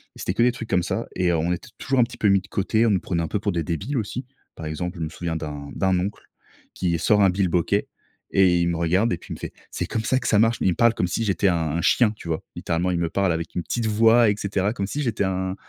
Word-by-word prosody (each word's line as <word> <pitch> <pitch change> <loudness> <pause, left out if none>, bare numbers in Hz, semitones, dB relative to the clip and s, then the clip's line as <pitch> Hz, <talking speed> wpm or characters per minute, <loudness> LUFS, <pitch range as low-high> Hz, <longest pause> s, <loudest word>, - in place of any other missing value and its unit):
c'était 90 - -3
que 110 - 0
des 125 - +4
trucs 115 -2 -8
comme 90 - +2
ça - - -2
et 90 -1 +2
on 85 +1 0
était 90 - -7
toujours 135 -1 0
un 120 - +7
petit 120 +1 -6
peu 105 - +1
mis 100 -1 +4
de 95 - -16
côté. 110 +3 +1
On - - +3
nous 95 - +3
prenait 85 -2 -2
un - - -2
peu 100 - -2
pour 100 -1 -1
des 85 - -1
débiles 95 - -3
aussi. 115 +4 -4 0.3
Par 80 - -8
exemple, 90 +4 -4
je 80 - -3
me 80 - -3
souviens 85 +1 -4
d'un 75 -3 -5
d'un 95 -1 +2
oncle 100 +3 -4 0.5
qui 85 -2 0
sort 105 +5 +3
un 95 - +6
bilboquet 90 -2 +1 0.4
et 90 -3 +4
il 85 - +2
me 85 - -1
regarde 90 +7 +2
et 85 - -2
puis - - -9
il - - -5
me - - -13
fait: - - -6 0.2
«C'est - - -3
comme 110 -1 -2
ça 130 +4 +1
que - - -4
ça 105 - +4
marche». 115 +1 +3
Mais - - +2
il - - +4
me - - -2
parle 115 -1 +4
comme - - +1
si 115 +6 -1
j'étais 100 0 +1
un 90 - +2 0.2
un 85 - -1
chien, 115 +3 +4
tu 105 -5 -11
vois? 80 - -2
Littéralement, 85 +2 -1
il 90 - 0
me 85 -1 0
parle 100 -3 +1
avec 80 0 -4
une 90 - 0
petite 115 +8 -2
voix, 115 +1 +5
et - - -1
cetera 100 +1 -1
comme 100 -3 -3
si 145 +7 -3
j'étais 110 -5 0
un 95 0 -2
95 Hz, 300 wpm, -23 LUFS, 85-110 Hz, 0.5 s, un